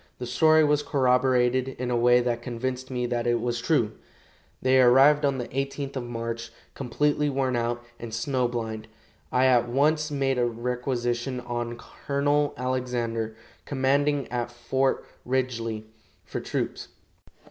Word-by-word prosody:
The 125 - -5
story 155 +5 +4
was 150 -1 +3
corroborated 130 -2 +2
in 125 0 -3
a - - +1
way 120 +1 +5
that 120 -1 -1
convinced 125 +2 -4
me 125 -1 -2
that 120 -1 -1
it 120 0 +2
was 120 0 -2
true. 115 -7 +2 0.7
They 130 0 +4
arrived 135 +4 +6
on 140 -2 +2
the 125 - -4
18th 135 +1 -3
of 130 -2 -3
March, 115 -1 -5 0.2
completely 145 +3 0
worn 130 -2 0
out 120 0 -1 0.2
and 115 -1 -7
snow 125 +2 0
blind. 110 -2 -4 0.4
I 130 +1 +3
at 120 -2 +4
once 150 +4 +2
made 135 -3 0
a 120 - +3
requisition 120 +1 -2
on 120 -1 -4
Colonel 145 +3 -1
Alexander, 120 -3 -2 0.3
commanding 140 0 +1
at 120 -1 -2
Fort 130 +3 0 0.2
Ridgely, 115 -4 -2 0.4
for - - -4
troops. - - -3
125 Hz, 145 wpm, -26 LUFS, 120-135 Hz, 0.7 s, arrived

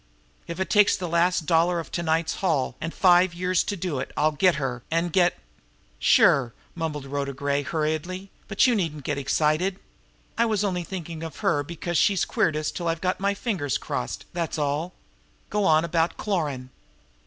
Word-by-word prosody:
If 170 +2 -6
it 190 - -2
takes 210 -2 +5
the 180 - -4
last 170 0 +2
dollar 170 +2 +3
of 165 - -7
to 170 - -2
night's 160 0 0
haul, 150 -10 0
and 165 - -3
five 180 -1 +4
years 180 0 +1
to 205 - -3
do 170 -6 -2
it, - - -5
I'll 155 +1 +3
get 180 +4 +3
her, 130 -4 -3
and 165 +1 0
get 180 -2 +3 0.3
" - - -36 0.2
"Sure!" 125 -4 +4 0.2
mumbled 155 -4 -4
Rhoda 140 0 -3
Gray 140 +1 -1
hurriedly. 160 +6 -3 0.2
"But 200 +3 +3
you 250 - +4
needn't 165 -9 -2
get 145 +1 -2
excited! 155 +7 +1 0.6
I 235 - +4
was 210 -2 0
only 180 -3 -1
thinking 170 -3 -6
of 165 -1 -7
her 145 - +3
because 170 +2 -2
she's 200 -5 +3
queered 155 - +1
us 155 0 -2
till 170 - -4
I've 165 0 0
got 185 +1 -1
my 200 +1 0
fingers 190 - -1
crossed, - - -4
that's 170 -2 -2
all. 150 +4 -1 0.6
Go 210 -1 +1
on 160 0 +4
about 165 0 0
Cloran." 145 -11 -2
165 Hz, 190 wpm, -25 LUFS, 150-185 Hz, 0.6 s, takes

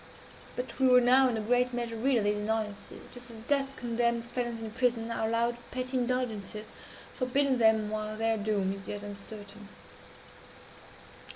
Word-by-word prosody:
But 250 +2 -5
we 265 - +5
were 250 0 +8
now, 255 +2 +5
in 230 - -1
a - - -1
great 245 +3 +2
measure, 235 -1 -2
rid 255 +3 +2
of 220 - +2
these 205 0 +2
annoyances 210 0 -3
just 245 0 -9
as 230 - -9
death 275 +2 0
condemned 235 -1 0
felons 240 -1 -3
in 220 -1 -6
prison 235 -1 0
are 220 -1 0
allowed 235 +1 +1
petty 255 +1 -3
indulgences, 240 -4 -1 0.5
forbidden 260 0 +1
them 220 -2 +4
while 215 0 -3
their 225 0 +2
doom 205 -2 0
is 195 0 -8
yet 205 0 -4
uncertain. 205 0 -9
230 Hz, 165 wpm, -30 LUFS, 215-250 Hz, 0.5 s, were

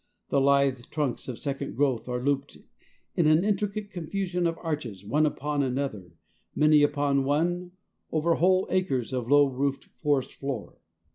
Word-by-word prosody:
The 140 - +2
lithe 140 -3 +3
trunks 145 -6 -2
of 125 -3 -5
second 140 0 -4
growth 130 -4 +1
are 125 0 -1
looped 140 0 -1 0.6
in 165 - +3
an 155 +3 +5
intricate 205 0 -1
confusion 180 0 -2
of 165 0 -2
arches 130 - -5
one 150 +9 +2
upon 145 0 -2
another, 125 -10 -3 0.4
many 150 0 +5
upon 145 -1 +2
one, 175 +6 0 0.4
over 160 +2 +2
whole 185 +3 +3
acres 135 -10 0
of 125 -2 -2
low 145 0 +6
roofed 135 +1 -2 0.2
forest 145 -4 +1
floor. 135 -6 -6
145 Hz, 150 wpm, -27 LUFS, 135-165 Hz, 0.6 s, low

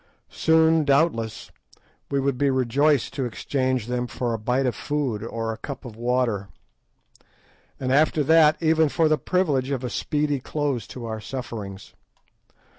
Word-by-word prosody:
Soon, 160 0 +3
doubtless, 140 -6 +1 0.6
we 140 - 0
should 135 -1 0
be 140 - +3
rejoiced 135 +2 +2
to 135 - -2
exchange 130 0 -1
them 125 0 -2
for 120 -1 -3
a 115 - -3
bit 125 +5 0
of 125 - +1
food 135 -4 -2
or 115 -1 -3
a 110 - -11
cup 140 -1 -7
of 115 -3 -9
water, 120 -4 0 1.3
and, 130 -1 -2
after 150 +1 +3
that, 155 +1 +5
even 160 -1 +3
for 160 +2 +2
the 155 0 +2
privilege 150 -8 0
of 135 -2 -2
a 125 - -3
speedy 145 +1 -1
close 140 -4 -2
to 125 -2 -8
our 110 -1 -5
sufferings. 105 -6 -7
130 Hz, 155 wpm, -24 LUFS, 120-150 Hz, 1.3 s, that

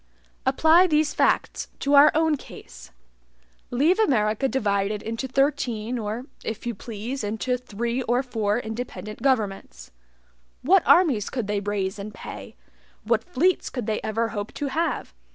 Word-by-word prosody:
Apply 330 +4 +5
these 305 -2 +2
facts - - +1
to 280 - +1
our 290 +1 +8
own 320 -1 +3
case. - - -12 0.8
Leave 305 - +2
America 220 - +2
divided 205 -5 -1
into 230 +4 -4
thirteen 255 -4 0
or, 220 +3 -4 0.2
if 225 +1 -5
you 240 - -2
please, 230 +4 -6
into 220 +4 -1
three 235 0 -3
or 245 +1 +1
four 220 -4 -1
independent 220 -3 -6
governments 205 - -1 0.7
what 370 +7 +5
armies 285 - +4
could 245 -4 -3
they 205 0 -1
raise 200 -1 -2
and 205 +1 -7
pay - - -9 0.5
what 225 0 +1
fleets 345 +10 +1
could 245 -4 -4
they 215 0 -1
ever 225 +1 -1
hope 205 -2 -5
to 285 - -2
have? 330 +5 -2
235 Hz, 145 wpm, -24 LUFS, 210-275 Hz, 0.8 s, our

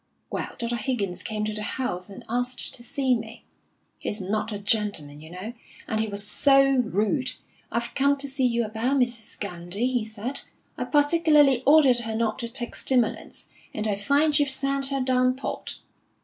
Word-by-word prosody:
Well, - - -4
Dr. 235 0 -2
Higgins 215 -6 -2
came 215 -2 -3
to 215 - -2
the 210 - -4
house, 210 -5 -3
and 195 - -10
asked 245 +2 -2
to 240 - -7
see 260 +2 0
me. 225 -1 -5 0.5
He's 210 - -3
not 210 +3 -2
a 205 - -3
gentleman, 200 -8 +1
you 160 - -12
know, 185 +7 -7 0.3
and 220 -2 -1
he 220 - +1
was 200 -1 -2
so 275 +4 +4
rude! 220 - 0 0.4
'I've 235 +1 -2
come 280 +1 +3
to 280 0 -2
see 265 -1 +1
you 235 -1 0
about 230 +6 0
Mrs. 240 -3 -2
Gandy,' 195 +5 -2
he 245 -3 0
said. 220 +5 -4 0.3
'I - - -3
particularly 295 -3 +4
ordered 280 -5 +6
her 225 -2 -4
not 220 -1 -1
to 235 -2 -4
take 240 0 0
stimulants, 250 -4 0 0.3
and 215 0 -1
I 205 - +1
find 285 +8 +2
you've 290 -1 +2
sent 275 +1 +1
her 275 -1 -1
down 255 0 +2
port.' 270 - -4
235 Hz, 180 wpm, -25 LUFS, 215-270 Hz, 0.5 s, ordered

